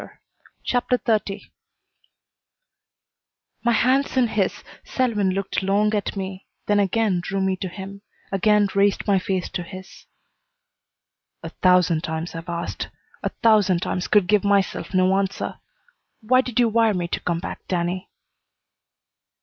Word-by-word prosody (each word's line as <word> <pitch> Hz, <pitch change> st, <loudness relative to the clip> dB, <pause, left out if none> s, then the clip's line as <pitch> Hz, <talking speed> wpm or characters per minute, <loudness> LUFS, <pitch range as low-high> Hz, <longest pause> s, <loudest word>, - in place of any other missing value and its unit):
CHAPTER 250 Hz, 0 st, +1 dB
XXX 210 Hz, -4 st, -2 dB, 2.1 s
My 235 Hz, 0 st, +3 dB
hands 260 Hz, +4 st, +2 dB
in 245 Hz, -3 st, +3 dB
his, 200 Hz, -4 st, -1 dB, 0.2 s
Selwyn 225 Hz, -7 st, 0 dB
looked 195 Hz, +2 st, -2 dB
long 205 Hz, +3 st, +2 dB
at 210 Hz, -1 st, -1 dB
me, 190 Hz, 0 st, -6 dB, 0.2 s
then 205 Hz, 0 st, +2 dB
again 200 Hz, -1 st, +1 dB
drew 195 Hz, +3 st, -3 dB
me 190 Hz, 0 st, +1 dB
to 185 Hz, -, -4 dB
him, 195 Hz, +2 st, -8 dB, 0.3 s
again 205 Hz, +1 st, +3 dB
raised 200 Hz, 0 st, +2 dB
my 200 Hz, -2 st, +3 dB
face 185 Hz, -1 st, -2 dB
to -, -, -4 dB
his. 185 Hz, +2 st, -11 dB, 1.4 s
"A -, -, -5 dB
thousand 180 Hz, -3 st, +3 dB
times 160 Hz, +1 st, -4 dB
I've 165 Hz, +1 st, -7 dB
asked. 170 Hz, 0 st, -4 dB, 0.3 s
A -, -, -1 dB
thousand 205 Hz, -6 st, +4 dB
times 180 Hz, -, -2 dB
could 205 Hz, -3 st, +4 dB
give 210 Hz, +2 st, +3 dB
myself 200 Hz, -2 st, +1 dB
no 185 Hz, +1 st, +4 dB
answer. 195 Hz, 0 st, -2 dB, 0.6 s
Why 255 Hz, +4 st, +4 dB
did 250 Hz, -2 st, -3 dB
you 240 Hz, -, +5 dB
wire 225 Hz, -1 st, +3 dB
me 175 Hz, -1 st, -2 dB
to -, -, -2 dB
come 170 Hz, -1 st, -1 dB
back, -, -, -7 dB
Danny?" 180 Hz, +1 st, -2 dB
195 Hz, 140 wpm, -23 LUFS, 185-215 Hz, 2.1 s, you